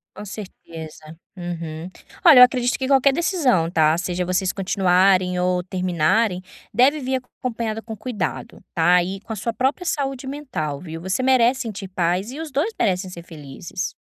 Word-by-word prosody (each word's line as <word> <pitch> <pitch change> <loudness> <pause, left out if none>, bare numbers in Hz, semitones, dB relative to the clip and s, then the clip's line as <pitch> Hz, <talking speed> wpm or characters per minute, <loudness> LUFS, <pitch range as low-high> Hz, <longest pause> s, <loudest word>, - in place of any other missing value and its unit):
Com 210 - -8
certeza. 160 -6 -10 0.2
Uhum. 170 -2 -6 0.3
Olha, 320 -8 +9
eu 250 - +12
acredito 250 -1 +3
que 260 - -2
qualquer 275 0 +4
decisão 275 - +1
tá, 160 -1 +3
seja 180 0 -2
vocês 185 +1 0
continuarem 185 -1 +2
ou 180 0 +1
terminarem, 180 +2 +1 0.3
deve 265 +7 +4
vir 260 0 -1 0.2
acompanhada 225 -3 -3
com 220 -1 -8
cuidado, 215 -7 -4
tá, 175 +2 +4
e 190 +2 -5
com 220 - -7
a - - -4
sua 225 +3 -3
própria 265 +9 -1
saúde 275 -5 -2
mental, 190 - -4
viu, 165 -1 -8
você 190 +8 -1
merece 260 0 +3
sentir 205 -4 -5
paz 185 +4 -1
e 285 - -8
os 320 -2 -6
2 295 - 0
merecem 185 -2 0
ser 170 -2 -9
felizes. 150 -5 -7
195 Hz, 165 wpm, -22 LUFS, 180-255 Hz, 0.3 s, eu